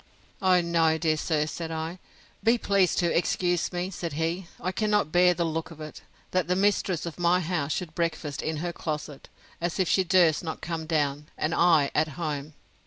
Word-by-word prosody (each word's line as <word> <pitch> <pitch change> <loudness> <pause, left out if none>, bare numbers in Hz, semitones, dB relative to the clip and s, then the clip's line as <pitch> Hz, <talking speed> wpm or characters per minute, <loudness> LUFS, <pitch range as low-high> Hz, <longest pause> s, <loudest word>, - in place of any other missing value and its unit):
O 185 -2 +4
no, 165 -2 +2
dear 160 -1 +1
sir, 155 -1 0
said 165 +1 -5
I; 160 +2 -4 0.4
be 230 +2 +4
pleased 200 -5 +2
to 170 -2 +1
excuse 175 0 +1
me! 180 +2 -3
said 170 -4 -5
he, 165 +4 -2
I 185 - -2
cannot 210 -4 +1
bear 180 0 +5
the 170 - 0
look 160 0 -3
of 165 -2 -12
it, 155 0 -8 0.3
that 185 -2 +1
the 180 - +1
mistress 190 -3 +1
of 170 0 -7
my 175 +1 +3
house 160 -4 -1
should 170 -1 -3
breakfast 160 -4 -2
in 155 0 -2
her 175 - -2
closet, 150 -3 -5 0.3
as 175 +2 -2
if 185 - +2
she 190 - +3
durst 180 -3 +4
not 160 -1 -4
come 160 -2 -4
down, 150 -2 0
and 155 - -1
I 160 -5 +4
at 155 +1 +2
home! 150 -3 -4
170 Hz, 195 wpm, -27 LUFS, 155-180 Hz, 0.4 s, bear